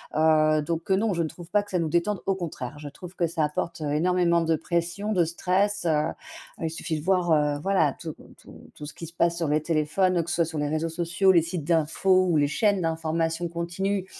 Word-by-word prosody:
Heu, 155 0 +4
donc, 165 +3 -4
heu, 190 - +4
non, 210 +1 +1
je 170 - -1
ne - - -1
trouve 170 +2 -11
pas 205 +2 +2
que 205 - -14
ça 180 - +1
nous 160 -2 -1
détende, 180 +5 0
au 195 - +1
contraire, 150 -7 -6
je 150 - -8
trouve 180 +5 -10
que 170 - +1
ça 165 -1 -1
apporte, 160 +3 -3
heu, 150 -1 -2
énormément 170 +1 +2
de 165 -1 +1
pression, 170 +5 -2
de 180 -5 +3
stress, 190 +5 0
heu, 155 -1 +1 0.5
il 165 - -1
suffit 160 0 -3
de 150 - -7
voir, 180 -1 +2
heu, 150 -1 +2
voilà, 185 -5 +2
tout 160 -2 -6 0.2
tout - - -15
tout 150 - -9
ce 150 - -8
qui 165 - -8
se 170 - -12
passe 170 0 +1
sur 165 -3 -1
les 150 +1 +2
téléphones, 165 +4 +1
que 165 - -8
ce 175 - 0
soit 170 - +2
sur 160 -1 -5
les 145 - 0
réseaux 155 +2 -1
sociaux, 175 +3 +2
les 170 -3 +5
sites 170 0 -4
d'info 175 +4 +2
ou 165 - +3
les 145 -1 +3
chaînes 200 +4 +1
d'information 165 +1 -1
continue 180 +3 -2
170 Hz, 240 wpm, -26 LUFS, 155-180 Hz, 0.5 s, les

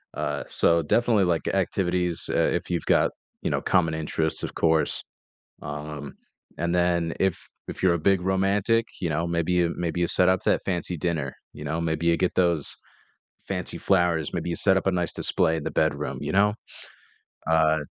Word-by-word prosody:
Uh, - - -2
so, 85 0 +3
definitely, 110 +5 +2
like, 85 -2 0
activities, 90 -2 0
eh, - - +2
if - - -4
you've 85 - -1
got, - - +3 0.3
you - - -1
know, - - 0
common 85 -3 +2
interests, 80 0 -2
of - - -5
course. 80 -1 +1 0.6
Um, 75 -1 -6 0.4
and 85 +1 -1
then 85 -2 +1
if 95 -2 +1 0.3
if - - -7
you're 90 -2 +5
a 85 - -1
big 95 -2 +1
romantic, 100 +4 +1
you 85 - 0
know, 80 +3 -1
maybe 85 +1 0
you 85 -1 +2
maybe 85 0 -2
you 85 - +2
set 90 +2 +3
up 95 -1 +2
that - - +2
fancy 90 -1 -2
dinner, 75 -4 -2 0.2
you 75 - -9
know; 80 +3 -2
maybe 80 0 -1
you 85 0 +4
get 90 - 0
those 85 -5 +1 0.7
fancy - - -3
flowers; 85 -5 +1
maybe - - -2
you 85 - -1
set 95 -2 +3
up - - -2
a - - +3
nice 90 -2 -1
display 80 - +1
in 80 - -5
the - - -3
bedroom, 75 -3 0
you 75 - -3
know? 105 +2 +3 1.0
Uh 80 -1 +4
85 Hz, 185 wpm, -25 LUFS, 80-90 Hz, 1.0 s, you're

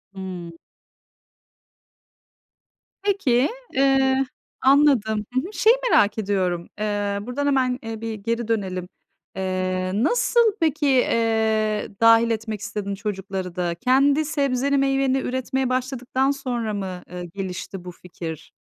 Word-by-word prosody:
Hımm. 180 -3 -6 2.5
Peki. 290 -11 +2 0.2
Eee, 270 0 +3 0.4
anladım, 260 -7 +4
hı 255 - +2
hı. 385 +5 -8
Şeyi 460 +2 +5 0.2
merak 205 +2 +4
ediyorum. 185 -4 -1
Eee, 205 -1 -1
buradan 250 +6 -3
hemen, 260 -2 +1
ııı, 225 -1 -5
bir 225 -1 -3
geri 230 +2 -3
dönelim. 190 -5 -2 0.5
Eee, 185 -1 -1
nasıl 465 - +3
peki, 310 -3 +1
eee, 220 -4 +2
dâhil 230 0 +6
etmek 220 -1 -3
istedin 200 -1 -4
çocukları 190 -3 -4
da? 175 -2 -1
Kendi 275 - +3
sebzeni, 280 -2 +1
meyveni 270 -1 +2
üretmeye 260 0 -1
başladıktan 255 +1 0
sonra 245 -6 -3
mı, 190 -3 -4
ııı, 180 0 -6
gelişti 185 +1 -6
bu 180 - -6
fikir? 170 -3 -8
225 Hz, 115 wpm, -23 LUFS, 195-270 Hz, 2.5 s, dâhil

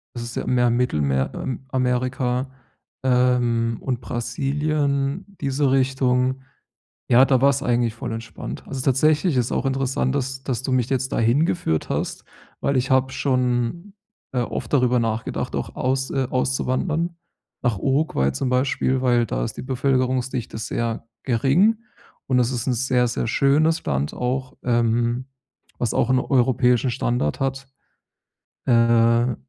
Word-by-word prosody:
Das 120 - -4
ist 120 - -7
ja - - -3
mehr 125 -1 +2
im 120 - +2
Mittelmer 70 - 0
ähm, 130 0 -5
Amerika, 130 0 0 0.5
ähm, 125 -2 +2
und 125 -2 -2
Brasilien, 140 - -1 0.2
diese 135 0 +1
Richtung. 130 -1 +1 0.7
Ja, 125 +2 +7
da 130 -2 +2
war 140 - +6
es 140 - 0
eigentlich 120 -2 +1
voll 120 -1 -5
entspannt. 115 - -7
Also 135 -1 -4
tatsächlich 150 +4 +2
ist 125 - +2
es - - -5
auch - - -1
interessant, 135 -1 0
dass 135 -1 -3
dass 130 -1 -3
du 130 - -2
mich 125 -2 +1
jetzt 130 -1 -1
da - - 0
hingeführt 115 - +1
hast, - - -3 0.4
weil 140 -1 +1
ich 130 +1 0
habe 130 0 +3
schon, 130 - -1 0.4
äh, 125 - -1
oft - - -4
darüber 125 -2 +3
nachgedacht, 115 -1 -2
auch - - -4
aus 130 +1 -1
äh, 135 -2 0
auszuwandern 135 +6 -1 0.5
nach 120 -5 0
Uruguay 135 - +1
zum 95 - -2
Beispiel, 130 0 +1
weil 120 -2 +3
da - - -2
ist - - -5
die - - -4
Bevölkerungsdichte 130 -2 -1
sehr 115 +1 -3 0.2
gering. 140 - +3 0.5
Und 130 -1 +3
es 125 0 +1
ist 125 0 -3
'n 125 - +2
sehr, 125 0 +1
sehr 120 0 -2
schönes 150 +7 +2
Land, 70 +1 -1
auch, 130 +1 -3
ähm 120 +1 +1 0.5
was 120 -3 0
auch 120 - +2
'n 130 - +4
europäischen 125 -1 +2
Standard 120 - -1
hat. 135 0 -2 1.0
Äh, 115 0 +3
125 Hz, 150 wpm, -22 LUFS, 120-135 Hz, 1.0 s, Ja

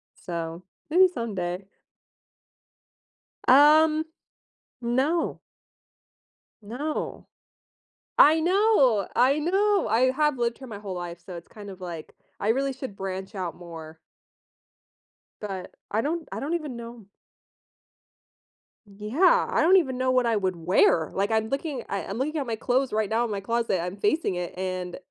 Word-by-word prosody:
So, 170 0 -6 0.3
maybe 370 +4 +6
someday. 195 - -4 1.8
Um, 305 +3 +6 0.8
no. 265 +8 0 1.2
No. 275 +9 -4 0.9
I 310 +2 +7
know, 340 - +3
I 260 +4 +4
know. 390 - +2
I 245 +4 +3
have 300 0 +1
lived 235 -1 -1
here 265 - -10
my 215 -4 -8
whole 195 -3 -6
life, 175 -1 -6
so 180 -2 -8
it's 170 - -11
kind 205 -2 -10
of 190 0 -11
like, 170 -3 -7 0.3
I 205 - -1
really 270 +4 +1
should 255 -6 -8
branch 190 +2 -5
out 180 -4 -4
more 165 -2 -10 1.4
but 195 -3 -6 0.2
I 215 - +1
don't 320 +5 -3
I - - -4
don't 295 +4 -3
even 305 -7 -3
know. 235 -2 -9 1.8
Yeah. 240 - +2
I - - +1
don't 360 +4 +6
even 265 -8 0
know 255 0 +1
what 255 -1 +3
I 230 -1 +2
would 190 -3 0
wear. 165 -2 +2
Like, 200 +3 0
I'm 220 0 +1
looking 275 -2 -3
I 200 - -3
I'm 200 - -5
looking 305 +4 -2
at 270 - -3
my 225 - -1
clothes 255 +4 0
right 215 -1 0
now 230 +2 +1
in 225 - -4
my 200 - -2
closet, 230 -3 -1
I'm 180 +3 -5
facing 325 - 0
it, 180 0 -5
and 185 -1 -4
230 Hz, 150 wpm, -26 LUFS, 190-290 Hz, 1.8 s, I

